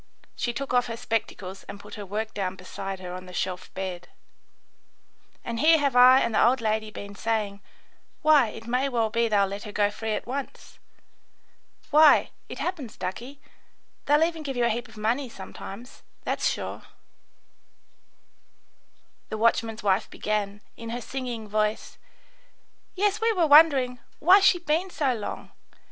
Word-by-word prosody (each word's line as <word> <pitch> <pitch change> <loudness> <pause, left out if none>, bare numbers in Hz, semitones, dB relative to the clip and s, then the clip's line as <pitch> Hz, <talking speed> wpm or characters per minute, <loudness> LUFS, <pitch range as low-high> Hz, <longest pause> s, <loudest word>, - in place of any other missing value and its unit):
She 240 - -1
took 270 +2 -5
off 245 -1 +3
her 230 -1 -5
spectacles 195 -4 -4
and 200 0 -9
put - - -13
her 205 -2 -7
work 215 +3 -3
down 190 -2 -3
beside 190 +1 -7
her 180 -1 -6
on 185 0 -8
the 180 - -11
shelf 180 0 -3
bed. 180 -2 -5 1.4
"And 230 -1 -3
here 320 +3 +6
have 280 -4 0
I 255 +1 +8
and 230 - 0
the - - +4
old 255 +2 +4
lady 220 -1 -1
been 200 -1 -9
saying, 210 -2 -2 0.6
'Why, 300 -5 +6
it 225 +1 -9
may 250 +4 0
well 230 -4 0
be 230 +1 +2
they'll 205 -2 +3
let 200 +1 -6
her 210 - -7
go 205 0 +1
free 220 +1 -3
at - - -3
once.' 270 +2 -7 1.1
Why, 305 0 +6 0.2
it - - -7
happens, 295 - -4
ducky, 240 +10 -6 0.7
they'll 295 +2 +5
even 325 -1 -1
give 275 -4 -5
you 240 - +2
a - - +2
heap 240 +2 -3
of 225 -1 -16
money 235 +5 -1
sometimes, 215 +4 -10 0.2
that's - - 0
sure," - - -5 2.5
the 215 - -4
watchman's 230 0 +1
wife 195 0 +1
began, 210 -1 -3
in 230 0 -8
her 240 +1 -4
singing 245 -3 -5
voice: 215 +1 -2 1.0
"Yes, 405 +2 +1
we 455 0 +3
were 355 -5 +2
wondering, 285 -5 +6 0.2
'Why's 385 +4 +6
she 355 -3 +4 0.3
so 285 -7 0
long? 215 -3 -6
230 Hz, 160 wpm, -26 LUFS, 205-270 Hz, 2.5 s, I